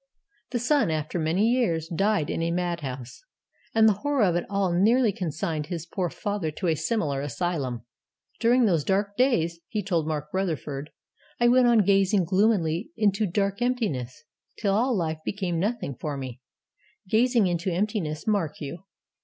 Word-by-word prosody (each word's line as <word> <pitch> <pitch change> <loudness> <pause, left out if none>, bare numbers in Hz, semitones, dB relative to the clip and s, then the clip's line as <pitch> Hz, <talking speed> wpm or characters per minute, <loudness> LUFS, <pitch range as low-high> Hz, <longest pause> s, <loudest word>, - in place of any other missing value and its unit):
The 245 - -1
son, 270 - +2
after 155 +2 -2
many 170 +7 +2
years, 185 -10 +1
died 195 -1 0
in - - -2
a 165 - 0
mad 175 0 -1
house; 130 - -7 0.5
and 220 0 +6
the 215 - +5
horror 290 -4 +1
of 180 -4 +3
it 175 - -1
all 195 -3 0
nearly 220 +6 +4
consigned 160 -4 -3
his 170 -3 -4
poor 180 0 -2
father 205 -2 -3
to 155 +5 -6
a 165 -2 +2
similar 160 -4 -1
asylum. 140 -5 -3 0.5
'During 240 +1 +4
those 170 -8 +2
dark 200 +3 0
days,' 170 -10 +2
he 210 -2 -3
told 170 -5 0
Mark 150 -1 -3
Rutherford, 155 -6 -2 0.5
'I 240 - +4
went 250 0 +5
on 230 -4 +4
gazing 195 -1 +3
gloomily 185 - +1
into 210 0 +2
dark 200 +4 -1
emptiness, 205 - -1 0.3
till 200 -2 0
all 240 +3 +2
life 160 -3 -2
became 185 -4 -2
nothing 205 - -2
for 145 +3 -5
me.' 130 -2 -7 0.7
Gazing 235 +2 +3
into 175 0 -1
emptiness, 175 -5 -2
mark 195 -8 0
you! 160 +6 -7
180 Hz, 165 wpm, -26 LUFS, 160-215 Hz, 0.7 s, and